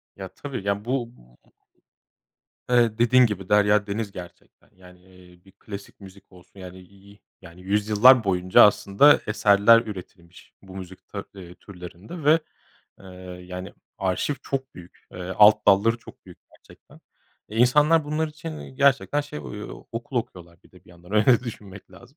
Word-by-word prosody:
Ya, 95 Hz, -1 st, -8 dB
tabii, 125 Hz, +3 st, -8 dB
ya, 100 Hz, +1 st, -2 dB
bu 125 Hz, -1 st, -2 dB, 1.6 s
ı -, -, +2 dB
eee, 115 Hz, -2 st, +2 dB
dediğin 125 Hz, +1 st, +4 dB
gibi 95 Hz, -4 st, -6 dB
derya 105 Hz, 0 st, +3 dB
deniz 100 Hz, 0 st, -4 dB
gerçekten. 90 Hz, -1 st, -14 dB
Yani, 90 Hz, -1 st, -18 dB
eee, 90 Hz, -1 st, -20 dB
bir 95 Hz, -, -20 dB
klasik 100 Hz, +1 st, -11 dB
müzik 100 Hz, 0 st, -16 dB
olsun 90 Hz, +2 st, -18 dB
yani, 90 Hz, 0 st, -11 dB
i 100 Hz, +2 st, -19 dB
i 105 Hz, -, -23 dB, 0.2 s
yani 85 Hz, 0 st, -14 dB
yüzyıllar 105 Hz, +5 st, +4 dB
boyunca 90 Hz, -1 st, +3 dB
aslında 105 Hz, +7 st, +4 dB
eserler 105 Hz, +1 st, +4 dB
üretilmiş 90 Hz, -5 st, -12 dB
bu 95 Hz, -1 st, -13 dB
müzik 95 Hz, 0 st, -11 dB
ta 100 Hz, -1 st, -7 dB
eee, 90 Hz, -2 st, -12 dB
türlerinde 95 Hz, -, -11 dB
ve, 155 Hz, +3 st, +5 dB, 0.6 s
eee, 95 Hz, -, -15 dB, 0.4 s
yani 90 Hz, 0 st, -8 dB, 0.3 s
arşiv 95 Hz, +9 st, -2 dB
çok 135 Hz, -1 st, -5 dB
büyük, 90 Hz, -1 st, -15 dB
eee, -, -, -10 dB, 0.2 s
alt 105 Hz, 0 st, +5 dB
dalları 105 Hz, +4 st, +4 dB
çok -, -, -17 dB
büyük -, -, -15 dB
gerçekten. -, -, -20 dB, 0.5 s
E, 110 Hz, -, -9 dB
insanlar 150 Hz, +6 st, +3 dB
bunlar 155 Hz, +2 st, -2 dB
için 155 Hz, +1 st, -9 dB
iii -, -, -12 dB
gerçekten 140 Hz, +1 st, +2 dB
şey 145 Hz, +1 st, -8 dB
o 105 Hz, -6 st, -9 dB
okul 120 Hz, +3 st, -6 dB
okuyorlar 85 Hz, -7 st, -6 dB
bir -, -, -22 dB
de 90 Hz, -, -20 dB
bir -, -, -19 dB
yandan 85 Hz, +3 st, -16 dB
öyle 110 Hz, +3 st, +4 dB
düşünmek 100 Hz, -5 st, -10 dB
lazım. 120 Hz, +9 st, -18 dB
100 Hz, 160 wpm, -23 LUFS, 95-120 Hz, 1.6 s, ve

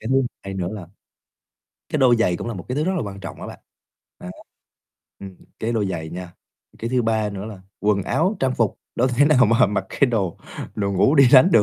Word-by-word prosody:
Cái 110 Hz, -, -6 dB
thứ 135 Hz, 0 st, +3 dB, 0.2 s
hai 95 Hz, 0 st, -6 dB
nữa 90 Hz, -2 st, -2 dB
là 100 Hz, -5 st, -7 dB, 1.0 s
cái 155 Hz, -, -1 dB
đôi 125 Hz, -3 st, +5 dB
giày 90 Hz, -6 st, +1 dB
cũng 115 Hz, -, -5 dB
là 115 Hz, -, -4 dB
một 90 Hz, -3 st, -8 dB
cái 125 Hz, -, -3 dB
thứ 150 Hz, -, 0 dB
rất 190 Hz, -, 0 dB
là -, -, -1 dB
quan 100 Hz, -1 st, -7 dB
trọng 95 Hz, -, -8 dB
á -, -, -6 dB
bạn, -, -, -9 dB, 0.6 s
đó. 90 Hz, -, -8 dB, 0.9 s
Ừm, 95 Hz, -2 st, -9 dB, 0.2 s
cái 115 Hz, +2 st, -2 dB
đôi 110 Hz, -3 st, 0 dB
giày 80 Hz, -3 st, -4 dB
nha, 90 Hz, 0 st, -7 dB, 0.5 s
cái 115 Hz, +2 st, -4 dB
thứ 125 Hz, -2 st, +2 dB
3 110 Hz, -2 st, 0 dB
nữa 100 Hz, 0 st, -6 dB
là 105 Hz, -4 st, -9 dB, 0.2 s
quần 105 Hz, -2 st, +1 dB
áo 185 Hz, -, 0 dB
trang 130 Hz, -1 st, +1 dB
phục, 115 Hz, -4 st, 0 dB, 0.2 s
đâu 130 Hz, +2 st, +2 dB
thể 125 Hz, +4 st, +3 dB
nào 130 Hz, -5 st, +5 dB
mà 115 Hz, -1 st, +4 dB
mặc 100 Hz, -1 st, -2 dB
cái 140 Hz, -, +2 dB
đồ 95 Hz, -7 st, -1 dB, 0.4 s
đồ 100 Hz, -1 st, -1 dB
ngủ 135 Hz, +10 st, +3 dB
đi 135 Hz, -4 st, +7 dB
đánh 145 Hz, +7 st, +8 dB
được. 110 Hz, -, +6 dB
110 Hz, 240 wpm, -22 LUFS, 95-130 Hz, 1.0 s, đánh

